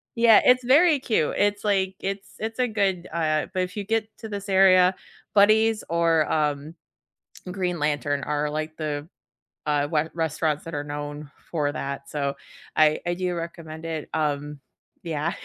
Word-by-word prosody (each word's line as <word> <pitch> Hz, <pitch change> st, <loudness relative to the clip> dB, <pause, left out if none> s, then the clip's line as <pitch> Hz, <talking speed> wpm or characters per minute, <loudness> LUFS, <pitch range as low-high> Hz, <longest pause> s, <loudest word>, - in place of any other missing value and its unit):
Yeah, 230 Hz, -2 st, +6 dB
it's 250 Hz, 0 st, +5 dB
very 300 Hz, +3 st, +5 dB
cute. 220 Hz, -, 0 dB
It's, 205 Hz, 0 st, +1 dB
like 190 Hz, -2 st, +1 dB
it's 195 Hz, +2 st, -5 dB
it's 225 Hz, +3 st, -4 dB
a 250 Hz, -, +3 dB
good, 195 Hz, -5 st, -1 dB
uh 155 Hz, -2 st, +1 dB
but 185 Hz, -, 0 dB
if 180 Hz, +3 st, -7 dB
you 200 Hz, -, -3 dB
get 220 Hz, 0 st, -1 dB
to 220 Hz, -, -7 dB
this 200 Hz, -1 st, -6 dB
area, 185 Hz, -1 st, +5 dB, 0.4 s
Buddy's 215 Hz, +2 st, +4 dB
or, 165 Hz, -2 st, +2 dB
um, 150 Hz, 0 st, -1 dB, 0.8 s
Green 180 Hz, -2 st, -2 dB
Lantern 145 Hz, -1 st, -1 dB
are, 150 Hz, 0 st, -1 dB
like, 155 Hz, +1 st, -4 dB
the, 150 Hz, -1 st, -3 dB, 0.6 s
uh, 145 Hz, -1 st, +1 dB
we 150 Hz, -, +4 dB
restaurants 160 Hz, -2 st, -1 dB
that 165 Hz, -2 st, -7 dB
are 145 Hz, -, -2 dB
known 145 Hz, 0 st, -6 dB, 0.2 s
for 150 Hz, -4 st, 0 dB
that, 140 Hz, -1 st, -5 dB
so 140 Hz, -2 st, -2 dB, 0.4 s
I 155 Hz, -1 st, +4 dB
I 175 Hz, -, +1 dB
do 180 Hz, 0 st, -2 dB
recommend 165 Hz, -1 st, -7 dB
it, 160 Hz, -2 st, -4 dB
um, 150 Hz, -1 st, -2 dB, 0.5 s
yeah. 165 Hz, +2 st, -2 dB
165 Hz, 165 wpm, -25 LUFS, 150-200 Hz, 0.8 s, Yeah